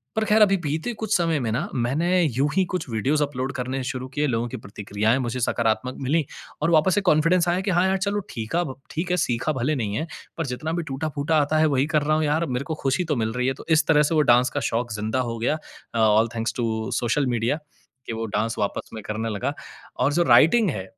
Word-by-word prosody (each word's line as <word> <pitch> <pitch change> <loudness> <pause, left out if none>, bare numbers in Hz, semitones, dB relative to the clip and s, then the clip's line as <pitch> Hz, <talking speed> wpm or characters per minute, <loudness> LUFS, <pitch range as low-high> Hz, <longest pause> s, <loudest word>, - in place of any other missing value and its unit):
पर 220 - +1
खैर 215 +1 +4
अभी 200 -2 +6
बीते 160 +10 -2
कुछ 215 0 -1
समय 165 -3 +1
में 115 -3 -1
ना, 115 - -1
मैंने 155 +9 +1
यूँ 140 0 +1
ही 190 - +4
कुछ 180 - -2
वीडियोज़ 135 +7 +1
अपलोड 135 -1 -3
करने 130 +1 -3
शुरू 130 0 -4
किए। 145 +2 -1
लोगों 120 -2 -1
की 130 - -6
प्रतिक्रियाएँ 105 +3 -1
मुझे 125 -1 -2
सकारात्मक 115 +2 0
मिलीं 150 +4 +1 0.4
और 150 - +2
वापस 165 +3 +4
से 205 - +2
कॉन्फिडेंस 170 0 +3
आया 180 +2 +1
कि 195 0 -1
हाँ, 180 +1 +3
यार 190 - +2
चलो 200 +2 -1
ठीकाब 130 +6 -2 0.2
ठीक 175 +3 -3
है, 180 - +2
सीखा 125 +1 0
भले 130 +4 0
नहीं 110 -6 -2
है 160 - -3 0.3
पर 165 - -1
जितना 145 +6 -3
भी 170 - -1
टूटा-फूटा 150 +1 -1
आता 150 +2 +1
है, 160 - +5
वही 140 -1 +2
कर 150 - +4
रहा 155 +1 +2
हूँ 155 - +1
यार, 155 +3 +1
मेरे 125 0 -2
को 160 - -3
खुशी 135 +7 +1
तो 150 -3 0
मिल 110 0 -1
रही 125 +1 -1
है, 135 - +1
तो - - -12
इस 160 -1 +4
तरह 150 -2 +5
से 160 +2 0
वो 155 - +5
डांस 125 +2 +3
का - - +3
शौक 120 +1 -1
जिंदा 110 +4 -2
हो 115 - -5
गया। 135 +7 +1 0.4
अ, 115 - +1
all 110 +1 +4
thanks 115 0 -1
to 110 -2 -1
social 125 +4 +1
media, 120 +7 0 0.5
के - - -3
वो 115 0 -3
डांस 110 +2 -1
वापस 100 - -2
में 110 - -6
करने 110 +2 -3
लगा 100 -3 -2 0.5
और 140 +3 +2
जो 175 +3 +3
राइटिंग 165 - +5
है, 95 -6 -4
140 Hz, 245 wpm, -24 LUFS, 115-160 Hz, 0.5 s, अभी